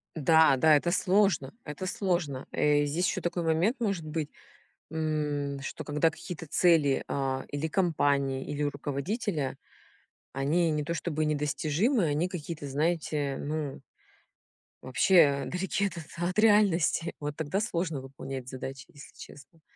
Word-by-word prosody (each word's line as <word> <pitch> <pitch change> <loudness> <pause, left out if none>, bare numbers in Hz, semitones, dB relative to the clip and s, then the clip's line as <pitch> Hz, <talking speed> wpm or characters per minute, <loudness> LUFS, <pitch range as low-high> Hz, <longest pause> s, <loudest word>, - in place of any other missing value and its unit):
Да, 160 -2 +5
да, 155 +2 +6
это 175 +4 +1
сложно, 190 -7 +2
это 150 +5 -6
сложно. 175 -9 -1
Э, 145 0 +3
здесь 170 +6 0
еще - - -1
такой 175 0 -2
момент 170 - +2
может 195 -8 -1
быть, 155 -1 -3 0.6
м, 150 -3 -2
что 135 - -6
когда 150 +2 +2
какие-то 165 0 -8
цели, 155 -4 +3
а, 135 -1 -2
или 145 +3 -3
компании, 140 -6 +1
или 145 0 -3
руководителя, 145 - -2 0.8
они 155 +5 +1
не 150 -1 -1
то 170 - -2
чтобы 155 -2 -2
недостижимы, 155 - +1
они 155 +4 0
какие-то, 160 -5 -6
знаете, 150 -2 -1
ну 150 -2 -4 1.0
вообще, 140 +1 +4
а, - - -5
далеки 190 +6 -1
от 190 - -2 0.2
от 180 +4 -1
реальности. 200 -6 +3
Вот 145 0 -4
тогда 165 +6 -1
сложно 170 - -2
выполнять 135 -1 -7
задачи, 135 +1 -7
если 145 - -14
честно. 155 +3 -14
155 Hz, 135 wpm, -29 LUFS, 140-175 Hz, 1.0 s, да